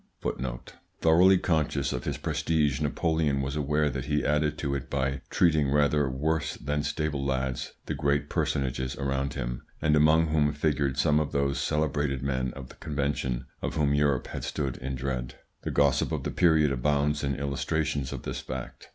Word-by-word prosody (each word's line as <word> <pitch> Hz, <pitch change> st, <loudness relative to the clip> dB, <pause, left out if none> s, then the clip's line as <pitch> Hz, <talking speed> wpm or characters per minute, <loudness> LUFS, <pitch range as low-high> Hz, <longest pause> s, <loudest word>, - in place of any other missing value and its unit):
Thoroughly 90 Hz, +4 st, +6 dB
conscious 80 Hz, -4 st, 0 dB
of 60 Hz, -, -4 dB
his -, -, -2 dB
prestige, 75 Hz, -2 st, 0 dB
Napoleon 75 Hz, -1 st, +1 dB
was 70 Hz, +1 st, -2 dB
aware 75 Hz, +1 st, +1 dB
that 70 Hz, -, -3 dB
he 75 Hz, 0 st, 0 dB
added 75 Hz, 0 st, +1 dB
to 70 Hz, -2 st, -2 dB
it 70 Hz, -, -4 dB
by 70 Hz, -1 st, -1 dB
treating 80 Hz, -5 st, +3 dB
rather 75 Hz, 0 st, +3 dB
worse 75 Hz, +3 st, -1 dB
than 75 Hz, 0 st, -2 dB
stable 75 Hz, -1 st, -2 dB
lads 65 Hz, -2 st, -2 dB
the -, -, -2 dB
great 70 Hz, 0 st, 0 dB
personages 65 Hz, -1 st, -1 dB
around 70 Hz, +1 st, -2 dB
him, -, -, -3 dB, 0.2 s
and 75 Hz, 0 st, +3 dB
among 80 Hz, +2 st, +4 dB
whom 75 Hz, -1 st, +2 dB
figured 70 Hz, -3 st, 0 dB
some 75 Hz, 0 st, +3 dB
of 75 Hz, -, -2 dB
those 70 Hz, 0 st, +1 dB
celebrated 75 Hz, -3 st, 0 dB
men 65 Hz, -2 st, -1 dB
of 65 Hz, -2 st, -8 dB
the -, -, -13 dB
Convention 70 Hz, -4 st, -2 dB, 0.2 s
of -, -, -3 dB
whom 70 Hz, -2 st, +2 dB
Europe 70 Hz, -3 st, +2 dB
had -, -, -5 dB
stood 70 Hz, -4 st, -2 dB
in 65 Hz, +1 st, -4 dB
dread. 65 Hz, -2 st, -3 dB, 0.3 s
The -, -, -4 dB
gossip 70 Hz, -2 st, +2 dB
of -, -, -2 dB
the -, -, -2 dB
period 80 Hz, -5 st, +4 dB
abounds 75 Hz, +3 st, +1 dB
in 70 Hz, -1 st, 0 dB
illustrations 70 Hz, 0 st, -1 dB
of -, -, -6 dB
this -, -, -4 dB
fact. 65 Hz, -2 st, -7 dB
70 Hz, 175 wpm, -28 LUFS, 70-75 Hz, 0.3 s, Thoroughly